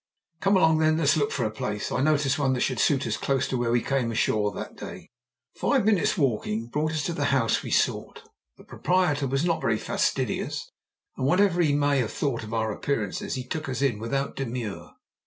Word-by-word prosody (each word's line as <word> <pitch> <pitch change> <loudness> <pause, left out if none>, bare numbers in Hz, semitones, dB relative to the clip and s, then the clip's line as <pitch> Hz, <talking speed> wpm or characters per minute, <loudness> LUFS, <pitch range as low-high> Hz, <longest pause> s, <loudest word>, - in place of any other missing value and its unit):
"Come 195 +1 +3
along, 160 -3 +4
then. 155 0 +3
Let's 155 -3 +3
look 145 -2 +1
for - - -1
a 110 - -1
place. 105 -1 -4
I - - 0
noticed 145 -1 +2
one 135 -2 +2
that 125 - -1
should 130 - 0
suit 140 -4 +2
us 110 -2 -1
close 135 0 0
to - - -1
where 120 -1 0
we 120 0 +2
came 130 -4 0
ashore 105 -2 +1
that - - -7
day." - - -9 0.4
Five - - +1
minutes' 210 -4 +2
walking 115 -6 0
brought 155 +5 -1
us 155 -2 -1
to 170 - -2
the 145 -3 -1
house 130 -5 +2
we - - -7
sought. - - 0 0.3
The - - -15
proprietor 165 -6 0
was 135 +5 0
not 165 -2 0
very 110 -1 +1
fastidious, - - -1 0.5
and 130 - 0
whatever 180 +1 +3
he 150 -4 +3
may 145 -1 +2
have 115 -4 -1
thought 135 -6 -2
of 110 - -8
our 110 -1 0
appearances 105 -3 -2
he 130 - -4
took 155 +3 -4
us 130 +1 -2
in 120 -7 +1
without 135 +5 -2
demur. 120 -6 -4
135 Hz, 210 wpm, -26 LUFS, 115-155 Hz, 0.5 s, along